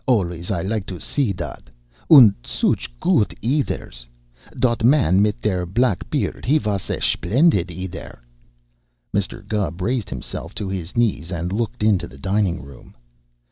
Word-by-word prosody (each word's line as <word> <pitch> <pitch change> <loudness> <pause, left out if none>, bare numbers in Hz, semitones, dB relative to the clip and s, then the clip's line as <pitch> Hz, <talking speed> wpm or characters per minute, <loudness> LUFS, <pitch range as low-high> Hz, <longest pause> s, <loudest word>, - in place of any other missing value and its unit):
Alvays 90 -8 0
I 90 -5 -1
like 105 0 -2
to 90 -3 -6
see 135 -8 -1
dot. 85 -8 -7 0.4
Und 125 -10 +9
sooch - - 0
goot 105 - +2
eaders! 115 - -2 0.5
Dot 120 -2 +1
man 115 - +4
mit 105 0 +1
der 90 -4 0
black 115 +2 0
beard, - - -2
he 145 +5 +3
vos 105 - -2
a - - -1
schplendid 130 - +2
eader!" 90 -4 -7 0.9
Mr. 100 +1 -2
Gubb 100 -6 -2
raised 115 +3 -1
himself - - -6
to 105 - -4
his 95 +1 -5
knees 100 -8 +1
and 85 +1 -3
looked 110 0 -2
into 105 -4 +2
the 65 - -14
dining 95 0 0
room. 70 -3 -14
100 Hz, 150 wpm, -21 LUFS, 90-115 Hz, 0.9 s, Und